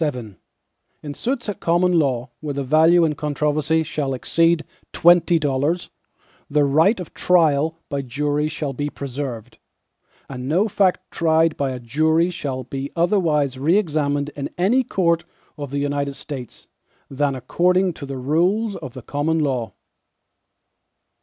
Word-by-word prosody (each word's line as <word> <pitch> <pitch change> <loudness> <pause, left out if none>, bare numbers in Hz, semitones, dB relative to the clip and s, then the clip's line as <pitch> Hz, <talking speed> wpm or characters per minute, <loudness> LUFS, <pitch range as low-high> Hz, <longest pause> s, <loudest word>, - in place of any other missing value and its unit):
VII 125 -8 -3 0.7
In 145 -1 -5
suits 245 - -3
at 205 - -4
common 175 +2 +2
law, 130 -4 -1
where 145 0 -5
the 140 - -2
value 160 +5 +5
in 155 - 0
controversy 150 +2 0
shall 150 -4 -2
exceed 165 +5 +1 0.3
twenty 175 0 +5
dollars, 145 +3 -1 0.6
the 150 0 +3
right 160 +10 +3
of 180 - -8
trial 160 -2 +2
by 140 -2 -3
jury 145 +3 -1
shall 150 -2 -4
be 145 +2 -3
preserved, 125 -5 -6 0.7
and 130 0 -6
no 185 +8 +2
fact 190 -3 +2
tried 160 -1 +2
by 140 -1 -1
a 130 -1 -5
jury 160 +8 +1
shall 135 -6 -4
be 135 +2 -6
otherwise 160 -7 +1
re 160 +8 +3
examined 145 -6 0
in 140 -1 -4
any 205 +9 +3
court 170 -6 +1 0.3
of 145 -2 -6
the 140 - -3
United 140 0 -2
States, 130 -5 -8 0.4
than 140 0 -1
according 180 +8 +1
to 140 - -9
the 135 -1 -5
rules 180 - +1
of 130 -5 -8
the 130 - -8
common 150 +5 -1
law. 130 -7 -1
150 Hz, 145 wpm, -21 LUFS, 140-170 Hz, 0.7 s, value